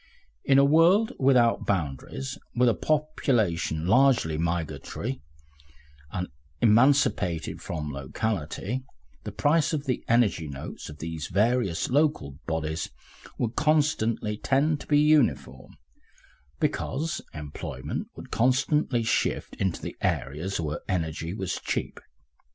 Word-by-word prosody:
In 135 Hz, -, +4 dB
a 140 Hz, -, +6 dB
world 170 Hz, +9 st, +5 dB
without 125 Hz, -4 st, +3 dB
boundaries, 70 Hz, -7 st, -2 dB, 0.2 s
with 125 Hz, +1 st, +4 dB
a 115 Hz, -, +4 dB
population 115 Hz, -, 0 dB
largely 120 Hz, -, +4 dB
migratory 85 Hz, -, -3 dB, 0.9 s
and 90 Hz, 0 st, -3 dB, 0.3 s
emancipated 110 Hz, -, +3 dB
from 75 Hz, -3 st, -4 dB
locality, 95 Hz, -, -3 dB, 0.4 s
the -, -, -4 dB
price 155 Hz, +2 st, +2 dB
of 145 Hz, -2 st, -2 dB
the 130 Hz, -3 st, -1 dB
energy 110 Hz, -9 st, +2 dB
notes 70 Hz, -2 st, -7 dB
of 75 Hz, -, -10 dB
these 80 Hz, 0 st, -5 dB
various 105 Hz, -2 st, +1 dB
local 140 Hz, -, +1 dB
bodies 80 Hz, 0 st, -2 dB, 0.5 s
would 115 Hz, -1 st, -2 dB
constantly 145 Hz, -8 st, +1 dB
tend 145 Hz, +5 st, +1 dB
to -, -, -11 dB
be 145 Hz, -, +4 dB
uniform, 145 Hz, -, +2 dB, 0.8 s
because 160 Hz, +4 st, -1 dB
employment 75 Hz, -3 st, -5 dB
would -, -, -11 dB
constantly 130 Hz, +1 st, +2 dB
shift 110 Hz, -, 0 dB
into 95 Hz, -3 st, -1 dB
the -, -, -5 dB
areas 80 Hz, +8 st, -1 dB
where 75 Hz, -2 st, -3 dB
energy 80 Hz, -2 st, -2 dB
was 95 Hz, -2 st, -3 dB
cheap. -, -, -3 dB
110 Hz, 115 wpm, -27 LUFS, -, 0.9 s, a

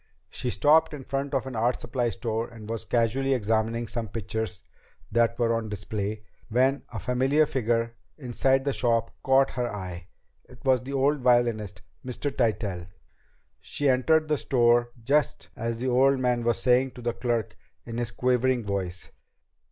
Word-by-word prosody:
She 125 Hz, -, -3 dB
stopped 150 Hz, +4 st, +4 dB
in 135 Hz, -, -9 dB
front 140 Hz, +2 st, -3 dB
of 135 Hz, -, 0 dB
an 130 Hz, -2 st, -6 dB
art 120 Hz, +3 st, +1 dB
supply 120 Hz, 0 st, -1 dB
store 115 Hz, 0 st, -3 dB
and 115 Hz, -2 st, -11 dB
was 115 Hz, 0 st, -4 dB
casually 125 Hz, +4 st, +1 dB
examining 115 Hz, +1 st, 0 dB
some 115 Hz, 0 st, -4 dB
pictures 110 Hz, 0 st, -4 dB, 0.5 s
that 115 Hz, +1 st, +2 dB
were 115 Hz, -1 st, +2 dB
on 115 Hz, -1 st, -2 dB
display 105 Hz, +1 st, -4 dB, 0.3 s
when 130 Hz, +3 st, +2 dB
a 115 Hz, -, -5 dB
familiar 135 Hz, +7 st, +2 dB
figure 115 Hz, -3 st, 0 dB, 0.2 s
inside 135 Hz, 0 st, +1 dB
the 140 Hz, -, +1 dB
shop 115 Hz, -3 st, +1 dB
caught 135 Hz, 0 st, +3 dB
her 120 Hz, 0 st, -2 dB
eye. 90 Hz, -4 st, -7 dB, 0.4 s
It 125 Hz, -, -16 dB
was 130 Hz, -2 st, +4 dB
the 135 Hz, +2 st, -7 dB
old 140 Hz, +2 st, +2 dB
violinist, 120 Hz, -5 st, +1 dB, 0.2 s
Mr. 135 Hz, +2 st, -3 dB
Tytell! 105 Hz, -7 st, -1 dB, 0.7 s
She 145 Hz, -1 st, -1 dB
entered 155 Hz, +5 st, +3 dB
the 150 Hz, -1 st, +1 dB
store 120 Hz, -1 st, +3 dB
just 145 Hz, +5 st, +1 dB
as 115 Hz, -1 st, -3 dB
the 130 Hz, +2 st, -2 dB
old 135 Hz, +2 st, +4 dB
man 125 Hz, -2 st, +1 dB
was 120 Hz, 0 st, +1 dB
saying 130 Hz, +1 st, +3 dB
to 125 Hz, -, -10 dB
the 120 Hz, 0 st, 0 dB
clerk 120 Hz, -4 st, -2 dB, 0.3 s
in 115 Hz, 0 st, -5 dB
his 120 Hz, -2 st, -1 dB
quavering 125 Hz, 0 st, +1 dB
voice 95 Hz, -3 st, -4 dB
120 Hz, 165 wpm, -26 LUFS, 115-130 Hz, 0.7 s, stopped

